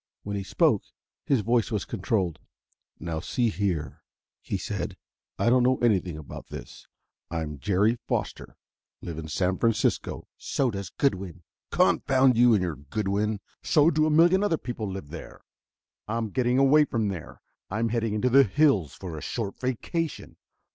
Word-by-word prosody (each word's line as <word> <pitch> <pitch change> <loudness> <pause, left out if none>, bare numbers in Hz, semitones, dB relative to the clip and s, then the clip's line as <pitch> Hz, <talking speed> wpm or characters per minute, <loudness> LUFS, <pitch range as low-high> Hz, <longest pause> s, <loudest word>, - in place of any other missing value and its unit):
When 100 0 -4
he 100 - -2
spoke, 95 - +2 0.5
his 135 -5 +3
voice 115 +1 +1
was 105 -4 -2
controlled. 95 -5 -1 0.6
"Now, 80 -1 -3
see 120 +7 0
here," 95 -7 -2 0.4
he - - -3
said: 95 -1 -4 0.4
"I 120 - +2
don't 125 0 +5
know 130 +1 +3
anything 95 -8 +1
about 75 - -9
this. - - -10 0.4
I'm 80 -3 -4
Jerry 105 - +2
Foster, - - -3 0.5
live 80 -2 -5
in 80 - -6
San 90 +4 0
Francisco 115 -2 0
" - - -67 0.2
"So 130 -3 +2
does 100 -3 -5
Goodwin." 95 - -2 0.3
"Confound 130 -2 +3
you 120 0 +6
and 95 - +1
your 85 -5 -3
Goodwin! 100 +7 -2 0.2
So 155 +2 +4
do 155 0 +2
a - - +2
million 170 +5 +5
other 170 -6 +2
people 115 -6 -5
live 95 -7 -7
there! 85 - -9 0.7
I'm 110 -1 -2
getting 125 +1 +1
away 135 +3 +6
from 110 -6 -1
there; 85 -4 -7 0.3
I'm 115 +4 0
heading 115 -2 -1
into 125 +4 +1
the 135 +2 +8
hills 105 - +2
for 90 -4 -7
a 75 - -6
short 110 -5 -4
vacation. 140 +6 -3
105 Hz, 160 wpm, -27 LUFS, 90-125 Hz, 0.7 s, the